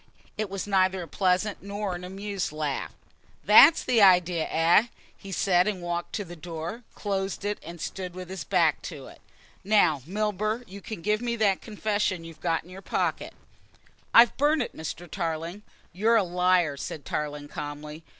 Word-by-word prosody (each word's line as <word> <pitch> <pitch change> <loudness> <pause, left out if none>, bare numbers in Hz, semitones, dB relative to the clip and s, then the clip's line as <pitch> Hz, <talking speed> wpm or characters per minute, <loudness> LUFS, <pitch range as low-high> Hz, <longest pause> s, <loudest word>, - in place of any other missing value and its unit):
It 215 -2 -3
was 195 -1 -4
neither 190 -2 +2
a - - -9
pleasant 190 +4 0
nor 200 0 -4
an 175 0 -6
amused 195 0 -4
laugh. 150 -3 -3 0.5
"That's 275 +10 +8
the 240 -3 +3
idea, 180 -4 +5
eh?" 170 +8 +4 0.3
he 195 - -11
said, 180 0 +2
walked 175 0 -4
to 205 - -3
the 175 0 -9
door, 170 +6 -6
closed 195 -1 -3
it 205 0 -2
and 170 +2 -9
stood 180 +1 -5
with 185 -1 -7
his 190 - -5
back 170 -5 +2
to 145 -6 -9
it. - - -14 0.4
"Now, 195 -8 +3
Milburgh, 215 +3 -1
you 200 +1 -10
can 205 -6 -7
give 210 +2 +1
me 240 -1 -1
that 205 -4 +2
confession 205 -4 -1
you've 165 -1 -12
got 165 -2 0
in 175 - -16
your 190 +1 -9
pocket." - - -2 0.8
"I've 235 0 +7
burnt 295 0 +3
it, - - -8
Mr. 160 +2 -6
Tarling." 165 +2 -4 0.3
"You're 220 +6 +3
a 215 - +3
liar," 180 -4 +2
said 145 +1 -6
Tarling 150 -1 -4
calmly. 150 +2 -7
185 Hz, 170 wpm, -27 LUFS, 165-205 Hz, 0.8 s, That's